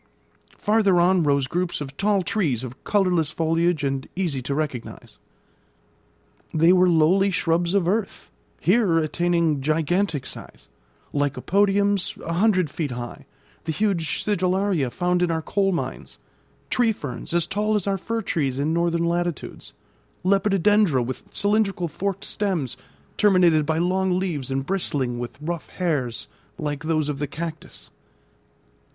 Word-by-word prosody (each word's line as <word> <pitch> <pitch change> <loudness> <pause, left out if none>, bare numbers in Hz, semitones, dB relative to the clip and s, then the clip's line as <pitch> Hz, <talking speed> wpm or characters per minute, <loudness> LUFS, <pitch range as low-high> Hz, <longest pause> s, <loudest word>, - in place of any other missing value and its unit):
Farther 210 -4 +3
on 180 +1 +4
rose 140 -3 +2
groups 175 +6 -2
of 140 -2 -7
tall 200 +1 +1
trees 155 - 0
of 130 +1 -9
colourless 180 -6 +2
foliage 165 0 0
and 135 -1 -2
easy 170 -8 -1
to 140 +3 -3
recognise. 145 -6 -5 1.4
They 165 +3 +5
were 185 0 +5
lowly 175 +4 +4
shrubs 170 0 +1
of 190 -4 +2
earth, 205 +2 -2 0.3
here 185 -3 +3
attaining 165 -1 +1
gigantic 155 +1 0
size; - - -10 0.4
lycopodiums, 195 +7 +1
a 165 - -2
hundred 185 -4 +2
feet 150 0 -3
high; 120 -1 -7 0.4
the 160 - -1
huge 165 -4 0
sigillaria, 185 -6 +1
found 180 +7 0
in 180 - +2
our 160 -1 -1
coal 195 +2 +1
mines; 175 - -4 0.5
tree 240 -2 +3
ferns, 145 - -6
as 170 -1 +2
tall 210 +3 0
as 205 - 0
our 195 -1 0
fir 225 +4 -3
trees 140 -8 -1
in 150 +3 0
northern 170 0 +1
latitudes; 175 -1 -3 0.5
lepidodendra, 195 - +3
with 130 +1 -6
cylindrical 205 -3 +1
forked 195 +5 -3
stems, 180 - -1 0.4
terminated 175 -7 +4
by 160 0 +1
long 185 +2 +1
leaves, 165 -8 -2
and 135 0 -2
bristling 140 -9 -1
with 120 0 -6
rough 165 +2 -5
hairs 145 -10 -2 0.3
like 150 0 -4
those 155 -2 +1
of 145 -2 -3
the 145 - -2
cactus. 155 - -7
170 Hz, 140 wpm, -23 LUFS, 150-195 Hz, 1.4 s, They